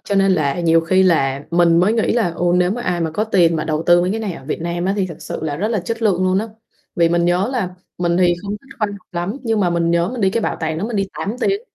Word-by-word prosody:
cho 200 - -2
nên 195 0 +4
là 155 -2 0
nhiều 165 -1 +4
khi 185 +3 +2
là 140 -6 +1
mình 170 -1 +4
mới 195 +5 +3
nghĩ 225 -1 +1
là, 225 -7 +1
ừ, 175 - -3
nếu 180 0 +2
mà 240 +4 -3
ai 180 -5 -1
mà 165 -1 -1
có 210 +7 -1
tiền 175 -6 +3
mà 155 - -2
đầu 155 0 -1
tư 175 0 +6
mấy 180 +1 0
cái 220 +3 -2
này 210 -4 -3
ở 135 - -10
Việt 150 - -4
Nam 170 +1 -3
á 190 - +1
thì 195 -2 0
thật 165 -4 -8
sự - - -6
là 150 -2 -2
rất 205 +7 -1
là 220 -4 0
chất 230 +6 -5
lượng 185 -4 +2
luôn 185 +1 +2
á, 220 +3 -3 0.5
vì 170 -2 +4
mình 170 0 +1
nhớ 180 +4 +1
là 190 -8 -2 0.2
mình 175 -1 +1
thì 175 -1 +3
không 200 - -5
thích 275 +4 -17
khoa 215 - +1
học - - -7 0.2
lắm, 175 +6 -3
nhưng 225 -3 0
mà 180 -3 +2
mình 170 -1 +1
nhớ 170 +1 +2
mình 250 0 -5
đi 190 -2 +3
cái 230 - -1
bảo - - -1
tàng 160 -1 -2
đó 200 - -2
mình 230 -2 -3
đi 195 -1 0
8 210 +5 -3
tiếng. 395 +7 +1
180 Hz, 315 wpm, -19 LUFS, 170-205 Hz, 0.5 s, tư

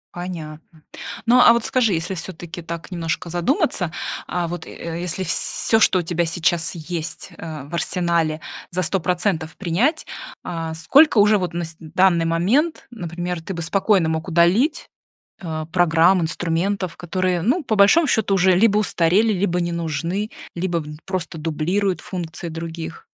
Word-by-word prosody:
Понятно. 160 -3 -8 0.4
Ну 245 +2 +5
а 245 - +8
вот 235 -1 +1
скажи, 230 -6 +2
если 170 +3 -2
всё-таки 175 -1 -7
так 170 +2 -7
немножко 170 -1 -3
задуматься, 180 - 0 0.4
а 175 -1 -2
вот, 170 -1 -6
э, 170 0 -6
если 180 +1 -2
всё 220 +5 +1
что 195 - +4
у - - +2
тебя 170 +1 0
сейчас 165 0 0
есть 170 +2 -5
э 155 -3 -6
в 145 +5 -14
арсенале, 170 -3 0 0.3
за 185 +1 -1
100% 180 -3 0
принять, 215 - 0 0.4
э 165 -2 -4
сколько 240 - +5
уже 210 0 +5
вот 180 -2 -3
на 175 0 -2
с 160 0 -8
данный 170 +1 +2
момент, 210 - +1
например, 175 -4 -4
ты 185 +3 -6
бы 170 - -4
спокойно 190 -1 +2
мог 160 +1 -2
удалить, 185 - +2 0.5
э, 160 -3 -4
программ, 175 +1 +4
инструментов, 175 +3 -1
которые, 180 0 -1
ну 275 - +1
по 220 - 0
большому 210 +11 +5
счету, 215 -4 +1
уже 185 -1 +4
либо 210 +2 +4
устарели, 205 +2 +3
либо 180 -2 0
не 170 0 -1
нужны, 170 +5 -2 0.2
либо 175 -1 -1
н 150 -1 -8
просто 185 -3 -3
дублируют 175 +5 -1
функции 170 -2 -6
других. 165 0 -7
175 Hz, 155 wpm, -21 LUFS, 165-195 Hz, 0.5 s, а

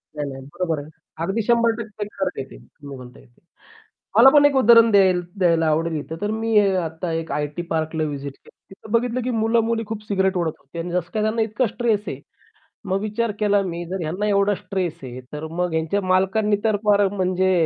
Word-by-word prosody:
नाही, 145 -1 -3
नाही 135 0 -8
बरोबर 165 -4 -1
आहे. 150 - -12 0.3
अगदी 195 +6 -1
100% 230 -2 0
खरं 195 -2 -2
आहे 135 - -2
ते - - -12
तुम्ही 140 -2 -12
म्हणताय 125 - -13
ते. - - -29 0.8
मला 245 +4 +9
पण 290 +1 +5
एक 290 -1 +4
उदाहरण 230 -2 +6
द्याय 195 -2 +6 0.3
द्यायला 165 -2 +3
आवडेल 160 +1 0
इथं 155 +2 -7
तर 205 - -1
मी 225 -1 +1 0.2
आता 165 0 -3
1 165 - -7
आयटी 150 +3 -2
पार्कला 160 0 -1
व्हिजिट 140 -2 -4
केली - - -21
होती - - -16
तिथं 210 +2 -14
बघितलं, 240 +2 +1
की 255 - -2
मुलं-मुली 225 0 +1
खूप 220 -1 -4
सिगारेट 190 -2 +1
ओढत 165 -3 -1
होते. 140 +5 -10
आणि 170 +1 -4
जसं 175 -1 -2
काय 215 - 0
त्यांना 215 +1 0
इतका 220 +3 0
स्ट्रेस 225 -2 0
आहे. - - -5 0.7
मग 190 +1 0
विचार 215 +2 -1
केला 205 -1 +3
मी 175 -2 -4
जर 185 +2 -4
ह्यांना 180 +7 -2
एवढा 200 0 +2
स्ट्रेस 180 -4 -4
आहे, 130 -1 -7
तर 150 +1 -5
मग 180 -1 0
ह्यांच्या 160 +5 0
मालकांनी 190 +3 +2
तर 215 -2 +3
फार 205 -1 +4
म्हणजे 190 -1 0
190 Hz, 205 wpm, -22 LUFS, 160-220 Hz, 0.8 s, मला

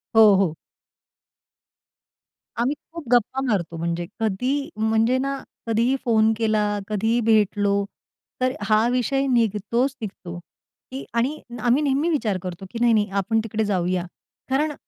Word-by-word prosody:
हो, 225 - +8
हो. 185 -5 +1 2.1
आम्ही 265 +5 +1 0.2
खूप 335 -7 -8
गप्पा 245 +2 +2
मारतो. 170 -6 -1
म्हणजे 170 +1 -2
कधी 255 - -1
म्हणजे 220 +3 +2
ना, 275 +1 -1 0.3
कधीही 230 +4 +2
फोन 220 -2 +4
केला, 220 -2 +1 0.2
कधीही 220 +3 +1
भेटलो, 205 -2 +3 0.7
तर 255 0 +2 0.2
हा 215 +2 +4
विषय 255 +2 +1
निघतोच-निघतो 230 -4 -1 0.5
की 265 +1 -5
आणि 255 +6 0 0.2
आम्ही 245 +6 +2
नेहमी 285 +4 +1
विचार 225 - 0
करतो, 185 +1 -6
की 230 - -5
नाही-नाही 220 -4 +3
आपण 225 +3 0
तिकडे 220 0 -2
जाऊया. 180 -2 0 0.4
कारण 295 +3 +1
225 Hz, 125 wpm, -23 LUFS, 205-260 Hz, 2.1 s, हो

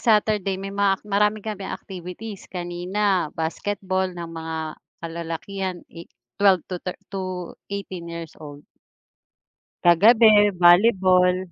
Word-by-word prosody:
Saturday 210 -3 +2
may 195 0 -6
mga 200 -1 +2
ak - - -29
marami 210 +1 +1
kaming 210 -3 -5
activities, 190 +3 -9
kanina 180 +1 -1
basketball 190 +3 -2
ng 170 -1 -6
mga 160 0 -5 0.5
kalalakihan, 170 +3 -4 0.2
i 170 0 -11 0.3
12 195 -4 +5
to 180 - -2
thir 180 - -5 0.7
18 190 -4 -6
years 170 -2 -7
old. 145 -1 -10 1.2
Kagabi 210 +4 +6
volleyball. 180 0 +5
190 Hz, 110 wpm, -23 LUFS, 175-205 Hz, 1.2 s, Kagabi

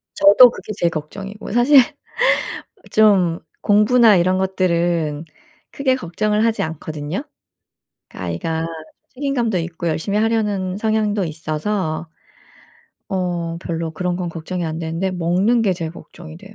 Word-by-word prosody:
저도 205 +5 +8
그게 215 - -8
제일 170 - +2
걱정이고 195 +8 -7
사실 245 +6 +6 1.1
좀 190 -6 +4 0.2
공부나 215 +1 +5
이런 185 +1 +2
것들은 170 -5 0 0.5
크게 270 -2 +1
걱정을 210 +2 -1
하지 225 -1 +1
않거든요. 155 -1 -4 0.9
아이가 160 - -3 0.4
책임감도 250 -7 -1
있고 170 0 -4
열심히 165 +6 -1
하려는 210 -4 0
성향도 215 -2 0
있어서 160 +2 -3 1.0
어 175 -3 -2
별로 165 -2 -3
그런 180 +1 -2
건 180 -1 -3
걱정이 170 +2 -5
안되는데 165 +3 -3
먹는 185 +7 +1
게 195 -3 +2
제일 165 -2 -5
걱정이 165 -2 -12
돼요. 200 +3 -14
185 Hz, 275 characters per minute, -20 LUFS, 165-210 Hz, 1.1 s, 저도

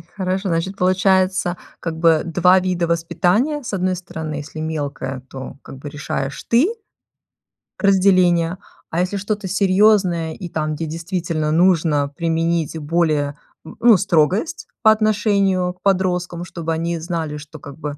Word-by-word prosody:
Хорошо, 190 0 -2
значит, 170 +4 -1
получается, 185 -1 +2 0.2
как 165 -1 -4
бы 160 -2 +4
2 180 +2 +4
вида 180 -2 -1
воспитания. 175 - +1
С 235 - -6
одной 185 -1 0
стороны, 160 -3 -6
если 150 +2 -7
мелкая, 145 -4 -4
то 130 0 -8
как - - -10
бы 145 +2 -8
решаешь 135 -2 -4
ты 255 - +3 1.1
разделение, 185 -3 +3 0.3
а 170 - 0
если 185 +3 -1
что-то 205 0 -3
серьёзное 185 -4 +3
и 180 - -7
там, 155 -1 -2
где 160 +2 -4
действительно 165 -1 -2
нужно 160 -4 +3
применить 165 +1 -1
более, 150 -2 0 0.3
м, - - -11
ну, 230 -4 +7
строгость 190 - +1
по 220 -1 +7
отношению 200 -4 +1
к 180 - -34
подросткам. 180 -3 0
Чтобы 165 -2 -5
они 165 +1 -2
знали, 160 -3 -3
что, 150 +1 -11
как 140 0 -11
бы, 145 -2 -5
175 Hz, 145 wpm, -20 LUFS, 160-190 Hz, 1.1 s, ну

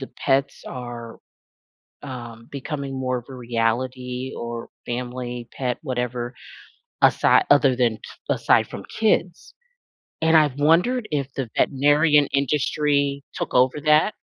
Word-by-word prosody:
the 135 - -6 0.2
pets 135 +1 +1
are, 120 -2 -7 0.8
um, 120 -4 -8
becoming 140 0 -5
more 130 -1 -1
of 120 - -10
a - - -8
reality 125 +2 -2
or 120 0 -5 0.2
family, 120 0 -5
pet, 125 -2 -2
whatever 125 -3 -3 0.7
asi - - +5
other 135 -3 +5
than 120 -3 +1 0.3
aside - - +3
from - - -8
kids. 195 -5 0 0.7
And 160 0 +5
I've 145 -3 +3
wondered 180 - +3
if 140 -2 -2
the 135 -3 -3
veterinarian 145 +2 +4
industry 140 0 +1
took - - -4
over 130 +3 +3
that? 155 +7 +4
130 Hz, 120 wpm, -23 LUFS, 125-145 Hz, 0.8 s, asi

